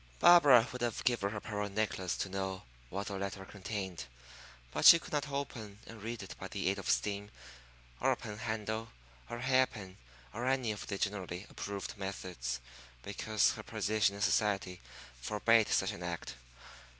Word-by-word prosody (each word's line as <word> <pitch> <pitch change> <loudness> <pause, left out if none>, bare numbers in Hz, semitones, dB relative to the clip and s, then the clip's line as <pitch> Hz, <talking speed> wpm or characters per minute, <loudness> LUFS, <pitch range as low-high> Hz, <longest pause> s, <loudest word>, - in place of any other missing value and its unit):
Barbara 140 - +8
would 125 - -7
have 120 -2 -1
given 120 -5 +2
her 105 +1 -4
pearl 105 -1 -3
necklace 100 -3 -1
to - - -1
know 95 0 -3 0.3
what 100 +2 -3
the 100 -1 -4
letter 95 0 -4
contained; 95 - -5 0.7
but - - -2
she 170 - +11
could 165 - -10
not 150 0 0
open 120 -7 -4
and 115 -2 -11
read 115 0 -4
it 95 - -8
by - - -5
the - - -1
aid - - -1
of - - -5
steam, 100 +12 0 0.7
or - - +3
a - - +3
pen 105 0 -7
handle, 110 -1 -3 0.4
or 120 - -4
a - - -7
hair 130 0 +4
pin, 95 -2 -10 0.4
or 120 +3 -3
any 130 -4 +1
of 105 - -6
the 100 - -2
generally 95 -2 -3
approved 100 +3 -5
methods, 90 -11 -4 0.4
because 105 +1 +1
her - - -6
position 105 -1 +1
in 100 - -3
society 95 -3 +1 0.4
forbade 110 - +3
such 95 - +2
an - - -8
act. 85 -6 -4
105 Hz, 175 wpm, -33 LUFS, 95-115 Hz, 0.7 s, she